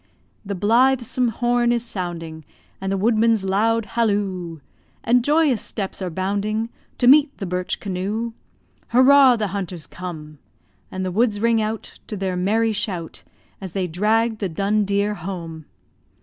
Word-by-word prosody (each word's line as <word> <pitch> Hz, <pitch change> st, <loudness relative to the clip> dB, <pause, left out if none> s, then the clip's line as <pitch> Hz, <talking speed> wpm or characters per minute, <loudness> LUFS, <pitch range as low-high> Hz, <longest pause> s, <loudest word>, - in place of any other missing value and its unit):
The 200 Hz, -1 st, -4 dB
blithesome 245 Hz, +4 st, +2 dB
horn 240 Hz, +1 st, +1 dB
is 240 Hz, 0 st, 0 dB
sounding, 170 Hz, -6 st, -5 dB, 0.4 s
And 195 Hz, 0 st, -2 dB
the 195 Hz, -, 0 dB
woodman's 220 Hz, 0 st, +2 dB
loud 220 Hz, +4 st, +1 dB
halloo; 195 Hz, -8 st, -1 dB, 0.4 s
And 245 Hz, +1 st, +3 dB
joyous 295 Hz, -5 st, +2 dB
steps 195 Hz, -2 st, -5 dB
are 185 Hz, -, -2 dB
bounding 205 Hz, +5 st, -2 dB, 0.3 s
To -, -, 0 dB
meet 285 Hz, +3 st, +6 dB
the 195 Hz, -, -4 dB
birch 180 Hz, 0 st, -2 dB
canoe. 205 Hz, +4 st, -3 dB, 0.5 s
"Hurrah! 260 Hz, +1 st, +6 dB
The 215 Hz, -3 st, -2 dB
hunters 185 Hz, -4 st, -5 dB
come." 155 Hz, -5 st, -8 dB, 0.5 s
And 185 Hz, 0 st, -3 dB
the 185 Hz, -, -2 dB
woods 215 Hz, +1 st, +1 dB
ring 230 Hz, 0 st, +2 dB
out 215 Hz, 0 st, -5 dB
To 210 Hz, -, -5 dB
their 190 Hz, -1 st, -2 dB
merry 220 Hz, +5 st, +1 dB
shout 185 Hz, -6 st, -4 dB, 0.4 s
As 190 Hz, -3 st, -7 dB
they 190 Hz, -2 st, -1 dB
drag 215 Hz, +6 st, +1 dB
the 195 Hz, -, -2 dB
dun 200 Hz, +5 st, 0 dB
deer 200 Hz, +1 st, 0 dB
home! 165 Hz, -4 st, -7 dB
205 Hz, 150 wpm, -22 LUFS, 185-230 Hz, 0.5 s, meet